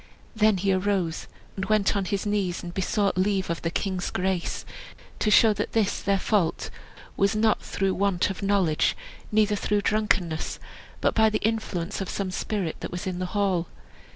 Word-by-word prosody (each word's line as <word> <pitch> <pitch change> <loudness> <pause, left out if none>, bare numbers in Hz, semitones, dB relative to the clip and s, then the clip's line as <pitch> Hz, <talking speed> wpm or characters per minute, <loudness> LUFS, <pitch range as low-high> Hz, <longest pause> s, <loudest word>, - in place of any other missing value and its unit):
Then 215 -2 +4
he 195 +1 +1
arose, 185 -3 -1 0.3
and 190 - -3
went 210 -1 +2
on 200 -1 0
his 195 +2 -2
knees, 200 -4 -1
and 175 0 -6
besought 195 +1 0
leave 190 -2 +1
of 170 - -3
the 165 - -1
king's 185 +1 -2
grace 185 -2 -2 0.5
to 215 - +1
show 220 +1 +6
that 205 - -3
this 220 -3 +1
their 200 0 +2
fault 190 -4 0 0.4
was 200 +2 +2
not 215 0 +2
through 195 -1 -1
want 195 -1 +1
of 190 - -7
knowledge, 195 -6 +2 0.3
neither 210 -1 +3
through 205 0 0
drunkenness, 195 -7 0 0.4
but - - +2
by 220 0 +4
the 215 - 0
influence 205 -4 -2
of 195 - -4
some 195 -2 -2
spirit 185 -3 -2
that - - -5
was 175 - -5
in 185 -1 -3
the 185 - -2
hall. 185 -4 +1
195 Hz, 180 wpm, -26 LUFS, 185-210 Hz, 0.5 s, show